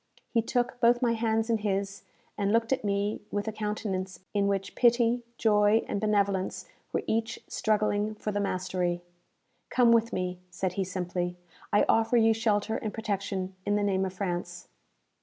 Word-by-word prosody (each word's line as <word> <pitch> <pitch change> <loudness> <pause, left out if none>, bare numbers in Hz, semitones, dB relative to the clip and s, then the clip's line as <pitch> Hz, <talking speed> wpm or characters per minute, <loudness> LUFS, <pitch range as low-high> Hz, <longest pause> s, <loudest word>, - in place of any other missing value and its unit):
He 230 - +3
took 245 +1 -1
both 240 +1 +4
my 235 -1 +3
hands 225 -1 +1
in 230 -2 +1
his, 200 -1 -2 0.3
and 200 -1 0
looked 230 +3 +2
at 260 - -2
me 205 +1 -1
with 205 +1 -2
a - - 0
countenance 205 -3 -3
in 200 -1 +2
which 195 -1 -1
pity, 240 0 +3 0.2
joy, 210 0 +4
and 200 - -2
benevolence 200 -3 0 0.3
were - - -1
each 225 +1 -1
struggling 215 0 0
for 210 - -3
the 205 - -1
mastery. 180 -2 -1 0.7
"Come 245 -2 +4
with 230 0 +4
me," 180 -1 -2
said 180 0 -2
he 195 - 0
simply. 180 -1 -3 0.3
"I 205 - +4
offer 225 +2 +3
you 225 -1 +5
shelter 220 0 0
and 215 - -3
protection 195 -3 -3
in 205 +1 +1
the 205 - +1
name 190 -2 +1
of 190 -1 -3
France." 175 -2 -4
205 Hz, 170 wpm, -28 LUFS, 190-225 Hz, 0.7 s, you